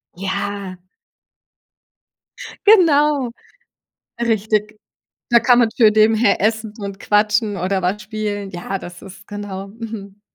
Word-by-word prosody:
Ja. 195 Hz, 0 st, -4 dB, 1.9 s
Genau, 300 Hz, -, +4 dB, 0.9 s
richtig. 215 Hz, -2 st, 0 dB, 0.5 s
Da 235 Hz, -, +7 dB
kann 245 Hz, +1 st, +4 dB
man 235 Hz, -2 st, +3 dB
nebenbei 220 Hz, -1 st, +4 dB
essen 220 Hz, 0 st, -1 dB
und 200 Hz, -1 st, -6 dB
quatschen 210 Hz, 0 st, +1 dB
oder 190 Hz, +2 st, -1 dB
was 185 Hz, +4 st, -1 dB
spielen. 210 Hz, -1 st, -4 dB
Ja, 185 Hz, +2 st, -5 dB
das 175 Hz, 0 st, -10 dB
ist, 195 Hz, 0 st, -13 dB
genau, 200 Hz, -2 st, -6 dB
mhm. 205 Hz, -2 st, -9 dB
210 Hz, 105 wpm, -19 LUFS, 195-225 Hz, 1.9 s, Da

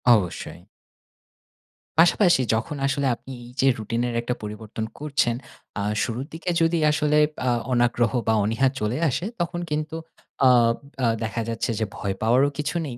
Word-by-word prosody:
অবশ্যই। 90 Hz, -6 st, -3 dB, 1.4 s
পাশাপাশি 175 Hz, -2 st, +5 dB
যখন 115 Hz, +6 st, -1 dB
আসলে 140 Hz, 0 st, 0 dB
আপনি 135 Hz, -, -12 dB
এই -, -, -12 dB
যে 135 Hz, -, +4 dB
রুটিন 115 Hz, +2 st, -2 dB
এর 120 Hz, -, -3 dB
একটা 125 Hz, +1 st, -2 dB
পরিবর্তন 110 Hz, +1 st, -5 dB
করছেন, 145 Hz, -5 st, +1 dB, 0.4 s
আ -, -, -1 dB, 0.2 s
শুরুর 120 Hz, +3 st, -3 dB
দিকে 165 Hz, +2 st, -4 dB
যদি 165 Hz, +1 st, +3 dB
আসলে 150 Hz, -1 st, +2 dB, 0.3 s
আ -, -, +4 dB, 0.2 s
অনাগ্রহ 120 Hz, -1 st, +2 dB, 0.2 s
বা 110 Hz, -, +4 dB
অনীহা 115 Hz, +5 st, +2 dB
চলে 105 Hz, +4 st, -1 dB
আসে, 170 Hz, -, -2 dB, 0.2 s
তখন 175 Hz, 0 st, -2 dB
কিন্তু 155 Hz, +1 st, -2 dB, 0.5 s
আব 115 Hz, -2 st, +5 dB, 0.3 s
আ -, -, +4 dB, 0.2 s
দেখা 110 Hz, +1 st, -2 dB
যাচ্ছে 115 Hz, +1 st, -2 dB
যে 110 Hz, -, +1 dB
ভয় 100 Hz, -1 st, -3 dB
পাওয়ারও 125 Hz, +6 st, +4 dB
কিছু 150 Hz, +3 st, -2 dB
নেই। 120 Hz, -2 st, -7 dB
120 Hz, 155 wpm, -24 LUFS, 115-150 Hz, 1.4 s, পাশাপাশি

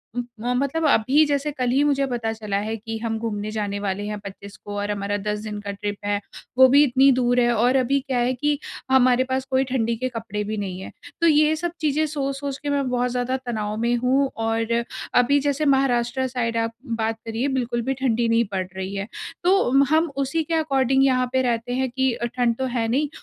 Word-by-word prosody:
उम, 245 Hz, -, -1 dB, 0.3 s
अ, -, -, +2 dB
मतलब 280 Hz, +5 st, 0 dB
अभी 275 Hz, +5 st, +4 dB
जैसे 290 Hz, 0 st, -1 dB
कल 255 Hz, -3 st, -2 dB
ही 270 Hz, +4 st, +3 dB
मुझे 275 Hz, -2 st, +2 dB
पता 230 Hz, -3 st, -2 dB
चला 210 Hz, -3 st, -3 dB
है 215 Hz, +2 st, -2 dB
कि 225 Hz, +1 st, -6 dB
हम 225 Hz, -1 st, -1 dB
घूमने 215 Hz, -2 st, -3 dB
जाने 205 Hz, -2 st, -3 dB
वाले 200 Hz, 0 st, -2 dB
हैं 210 Hz, -1 st, -4 dB
25 200 Hz, +1 st, -10 dB
को 205 Hz, -, -6 dB
और 205 Hz, 0 st, -2 dB
हमारा 205 Hz, 0 st, -2 dB
10 210 Hz, +1 st, -3 dB
दिन 210 Hz, -1 st, -5 dB
का 200 Hz, 0 st, -5 dB
ट्रिप 205 Hz, +1 st, -4 dB
है। 205 Hz, 0 st, 0 dB, 0.4 s
वो 260 Hz, 0 st, +9 dB
भी 285 Hz, -, +8 dB
इतनी 270 Hz, 0 st, +5 dB
दूर 245 Hz, -1 st, +2 dB
है 240 Hz, 0 st, +3 dB
और 245 Hz, +4 st, +2 dB
अभी 270 Hz, +1 st, +2 dB
क्या 265 Hz, -2 st, -3 dB
है 245 Hz, +1 st, +1 dB
कि 295 Hz, +3 st, 0 dB, 0.3 s
हमारे 255 Hz, -1 st, +5 dB
पास 260 Hz, 0 st, -2 dB
कोई 265 Hz, 0 st, +2 dB
ठंडी 230 Hz, -2 st, 0 dB
के 255 Hz, +2 st, -2 dB
कपड़े 215 Hz, -3 st, -4 dB
भी 215 Hz, +1 st, -4 dB
नहीं 190 Hz, -2 st, -4 dB
हैं, -, -, -8 dB, 0.3 s
तो 335 Hz, -, +5 dB
ये 305 Hz, 0 st, +4 dB
सब 345 Hz, +2 st, -3 dB
चीज़ें 305 Hz, +1 st, +1 dB
सोच-सोच 275 Hz, -2 st, -3 dB
के 290 Hz, -, -2 dB
मैं 280 Hz, -2 st, 0 dB
बहुत 250 Hz, 0 st, 0 dB
ज़्यादा 250 Hz, +1 st, -1 dB
तनाव 215 Hz, -3 st, -3 dB
में 235 Hz, +1 st, +1 dB
हूँ 270 Hz, +2 st, +3 dB, 0.2 s
और 225 Hz, +1 st, 0 dB, 0.4 s
अभी 285 Hz, +3 st, +3 dB
जैसे 285 Hz, +2 st, 0 dB
महाराष्ट्र 260 Hz, -2 st, +2 dB
साइड 230 Hz, -2 st, -2 dB
आप 230 Hz, 0 st, -1 dB
बात 225 Hz, -2 st, -2 dB
करिए, 225 Hz, +4 st, -2 dB
बिल्कुल 245 Hz, -3 st, -1 dB
भी 270 Hz, -, +2 dB
ठंडी 240 Hz, -3 st, 0 dB
नहीं 230 Hz, 0 st, +3 dB
पड़ 185 Hz, -1 st, -1 dB
रही 190 Hz, +1 st, -4 dB
है। 195 Hz, +2 st, -3 dB, 0.4 s
तो 375 Hz, +2 st, +5 dB
उम, 275 Hz, +2 st, +5 dB
हम 315 Hz, 0 st, +2 dB
उसी 320 Hz, +4 st, -1 dB
के 330 Hz, -, -4 dB
अकॉर्डिंग 270 Hz, -4 st, +2 dB
यहाँ 255 Hz, -1 st, +2 dB
पे 260 Hz, -, +3 dB
रहते 240 Hz, 0 st, -1 dB
हैं 260 Hz, 0 st, 0 dB
कि 265 Hz, +1 st, +1 dB
अ, 240 Hz, -, -3 dB
ठंड 240 Hz, -1 st, 0 dB
तो 265 Hz, -, -1 dB
है 225 Hz, -1 st, 0 dB
नहीं 280 Hz, +5 st, 0 dB
245 Hz, 225 wpm, -23 LUFS, 225-270 Hz, 0.4 s, वो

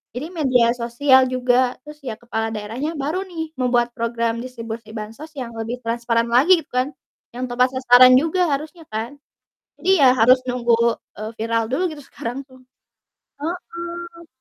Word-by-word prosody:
jadi 305 Hz, +8 st, -5 dB
media 255 Hz, -8 st, +3 dB
sosial 255 Hz, +3 st, +3 dB
juga, 255 Hz, 0 st, +1 dB
terus 300 Hz, 0 st, -12 dB
ya, 220 Hz, -, -3 dB
kepala 225 Hz, -1 st, -3 dB
daerahnya 235 Hz, +10 st, -4 dB
baru 315 Hz, +7 st, -3 dB
nih, 320 Hz, -3 st, -6 dB
membuat 245 Hz, -1 st, +2 dB
program 230 Hz, -1 st, -2 dB
distribusi 230 Hz, -3 st, -7 dB
bansos 225 Hz, +9 st, -8 dB
yang 250 Hz, -4 st, -5 dB
lebih 240 Hz, +3 st, -5 dB
transparan 230 Hz, 0 st, 0 dB
lagi, 320 Hz, +8 st, +5 dB
gitu -, -, -40 dB
kan, 255 Hz, +3 st, -1 dB, 0.4 s
yang 250 Hz, -, -4 dB
tepat 250 Hz, +1 st, +3 dB
sasaran 255 Hz, 0 st, +7 dB
juga 330 Hz, +6 st, +2 dB
harusnya 310 Hz, +3 st, -4 dB
kan. 230 Hz, +6 st, -5 dB, 0.6 s
Jadi 375 Hz, -, 0 dB
ya, 255 Hz, -, +7 dB
harus 250 Hz, +1 st, +6 dB
nunggu, 240 Hz, -2 st, +2 dB, 0.4 s
eee, 215 Hz, +1 st, -5 dB
viral 230 Hz, 0 st, 0 dB
dulu 360 Hz, +7 st, +1 dB
gitu 295 Hz, -2 st, -9 dB
sekarang 250 Hz, +3 st, -6 dB
tuh. 260 Hz, -1 st, -18 dB, 0.8 s
Heeh. 340 Hz, 0 st, -6 dB
255 Hz, 155 wpm, -21 LUFS, 235-300 Hz, 0.8 s, sasaran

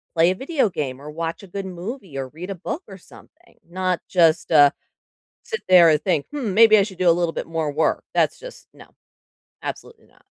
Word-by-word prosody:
play 170 Hz, +2 st, +4 dB
a -, -, -2 dB
video 270 Hz, -, 0 dB
game, 140 Hz, -7 st, -5 dB
or 150 Hz, -, -9 dB
watch 165 Hz, +4 st, -5 dB
a -, -, -11 dB
good 195 Hz, +2 st, -6 dB
movie, 185 Hz, -, -7 dB
or 135 Hz, -1 st, -4 dB
read 170 Hz, +7 st, -9 dB
a 195 Hz, -, -4 dB
book 300 Hz, -, -6 dB
or 195 Hz, -, -11 dB
something. 310 Hz, -, -20 dB
Not 185 Hz, 0 st, -2 dB
just, 165 Hz, -3 st, +2 dB
uh, 145 Hz, -3 st, +7 dB, 0.7 s
sit 460 Hz, -1 st, -5 dB
there 180 Hz, -2 st, +7 dB
and 155 Hz, -1 st, +2 dB
think, 170 Hz, -7 st, 0 dB
"Hmm, 255 Hz, -9 st, -3 dB
maybe 220 Hz, +1 st, +7 dB
I 200 Hz, -, +4 dB
should 190 Hz, -2 st, -9 dB
do 180 Hz, -, +4 dB
a -, -, +7 dB
little 170 Hz, -1 st, 0 dB
bit -, -, -5 dB
more 160 Hz, -2 st, -2 dB
work." 155 Hz, +3 st, 0 dB
That's -, -, +1 dB
just -, -, -12 dB
No. -, -, -16 dB, 0.7 s
Absolutely 460 Hz, -1 st, -8 dB
not. -, -, -29 dB
180 Hz, 215 wpm, -22 LUFS, 160-205 Hz, 0.7 s, uh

